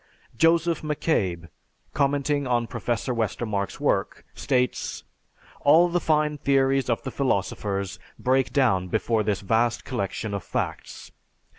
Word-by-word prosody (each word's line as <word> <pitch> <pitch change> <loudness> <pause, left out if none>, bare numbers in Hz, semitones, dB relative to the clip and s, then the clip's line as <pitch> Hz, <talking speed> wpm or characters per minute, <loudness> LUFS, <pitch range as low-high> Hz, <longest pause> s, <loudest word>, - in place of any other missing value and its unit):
Joseph 165 +3 +3
McCabe, 100 - -1 0.5
commenting 140 0 +1
on 120 -1 +1
Professor 120 +1 -2
Westermarck's 110 -3 -2
work - - -1
states, 125 -2 -1 0.6
"All 165 +5 +5
the 175 +1 +1
fine 150 -2 +1
theories 135 -1 +2
of 115 - 0
the 130 - -4
philosophers 100 -6 -2 0.2
break 130 0 +1
down 110 -9 +2
before 110 +5 0
this 105 -2 -1
vast 115 +3 +1
collection 110 -3 -3
of 100 - -3
facts. - - -5
125 Hz, 120 wpm, -25 LUFS, 110-145 Hz, 0.6 s, All